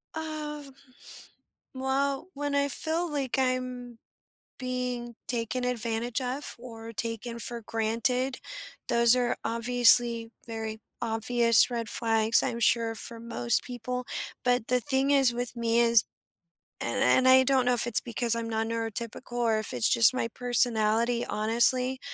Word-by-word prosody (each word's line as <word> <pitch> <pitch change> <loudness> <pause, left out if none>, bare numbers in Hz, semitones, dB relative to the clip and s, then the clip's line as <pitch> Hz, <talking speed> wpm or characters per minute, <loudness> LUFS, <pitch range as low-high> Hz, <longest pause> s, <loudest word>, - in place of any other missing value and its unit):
Uh, 305 -2 -5 1.1
well, 270 +4 -1
when 290 0 -3
I 280 0 +2
feel 325 +4 -2
like 275 -3 -2
I'm 255 -2 -2 0.6
being 250 -2 -4
taken 245 +1 -2
advantage 235 0 -2
of 260 +3 -5
or 230 -2 -10
taken 230 +1 -5
for 235 +1 -3
granted, 235 +4 -1 0.5
those 235 +1 +5
are 245 -1 0
obviously 235 0 +3 0.2
very 220 -1 -6 0.2
obvious 230 +1 +3
red 230 -2 -3
flags, 225 -1 +2
I'm 235 - -3
sure, 230 0 +2
for 230 +1 -6
most 235 0 +1
people. 250 0 -5 0.4
But 245 -2 +1
the 250 0 +2
thing 270 +1 0
is 270 -4 +4
with 245 0 -4
me 230 0 +1
is 230 -1 +5 0.8
and - - -2
and 260 0 +4
I 260 0 +7
don't 260 -1 +2
know 250 - +3
if 235 - 0
it's 240 - +1
because 235 -1 -1
I'm 230 0 -4
non-neurotypical 225 +1 -3
or 230 -2 +1
if 215 - -4
it's 120 -3 +1
just 230 +2 +5
my 230 - -1
personality, 235 -1 +1
honestly, 250 +4 +2
240 Hz, 140 wpm, -28 LUFS, 230-255 Hz, 1.1 s, I